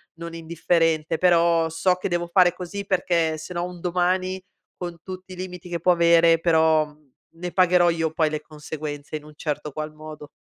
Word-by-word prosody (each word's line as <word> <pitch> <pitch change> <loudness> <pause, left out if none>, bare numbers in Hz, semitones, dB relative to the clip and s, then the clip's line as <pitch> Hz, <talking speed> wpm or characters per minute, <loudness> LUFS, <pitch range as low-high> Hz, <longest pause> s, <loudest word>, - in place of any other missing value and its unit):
non 170 0 -8
indifferente, 165 -1 0
però 170 -2 +3
so 180 +3 +1
che 185 - -4
devo 175 0 -1
fare 175 0 +4
così, 185 +3 -6
perché 170 -4 +1
se 155 +4 -8
no 175 0 -2
un 180 0 -8
domani, 185 +1 0 0.3
con 175 -2 -6
tutti 185 0 -9
i - - -8
limiti 180 -1 -8
che 170 - -3
può 180 +2 +3
avere, 170 -1 +5
però, 160 -2 +3
mhmm, 150 0 -21 0.3
ne 180 0 -4
pagherò 180 -1 +4
io 165 -1 -1
poi 160 -1 +1
le 155 - -3
conseguenze, 150 -1 -7
in 150 - -6
un 150 - -13
certo 150 -1 -4
qual 155 +1 -5
modo. 155 -1 -10
170 Hz, 190 wpm, -24 LUFS, 155-180 Hz, 0.3 s, avere